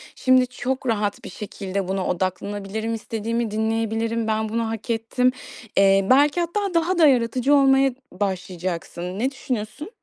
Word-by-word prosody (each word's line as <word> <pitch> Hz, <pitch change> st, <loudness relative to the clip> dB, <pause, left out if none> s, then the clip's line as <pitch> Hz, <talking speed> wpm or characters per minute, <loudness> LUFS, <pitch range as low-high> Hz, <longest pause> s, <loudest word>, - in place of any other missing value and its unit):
Şimdi 255 Hz, -1 st, +4 dB
çok 260 Hz, +2 st, -3 dB
rahat 205 Hz, -3 st, -1 dB
bir -, -, -7 dB
şekilde 195 Hz, -2 st, -5 dB
buna 190 Hz, -1 st, -1 dB
odaklanabilirim. 200 Hz, +4 st, -2 dB
İstediğimi 225 Hz, 0 st, -2 dB
dinleyebilirim. 225 Hz, +1 st, -1 dB
Ben 220 Hz, 0 st, 0 dB
bunu 230 Hz, +1 st, -1 dB
hak 225 Hz, +1 st, -6 dB
ettim." 230 Hz, +3 st, +1 dB, 0.5 s
Eee, 195 Hz, 0 st, +5 dB
belki 285 Hz, +5 st, +5 dB
hatta 385 Hz, +3 st, -1 dB
daha 335 Hz, +2 st, +1 dB
da 325 Hz, -3 st, +7 dB
yaratıcı 255 Hz, +1 st, +2 dB
olmaya 270 Hz, -1 st, +5 dB
n 250 Hz, -, -10 dB, 0.3 s
başlayacaksın. 180 Hz, -1 st, -3 dB
Ne 260 Hz, +4 st, +1 dB
düşünüyorsun? 255 Hz, -, -5 dB
225 Hz, 145 wpm, -23 LUFS, 200-255 Hz, 0.5 s, da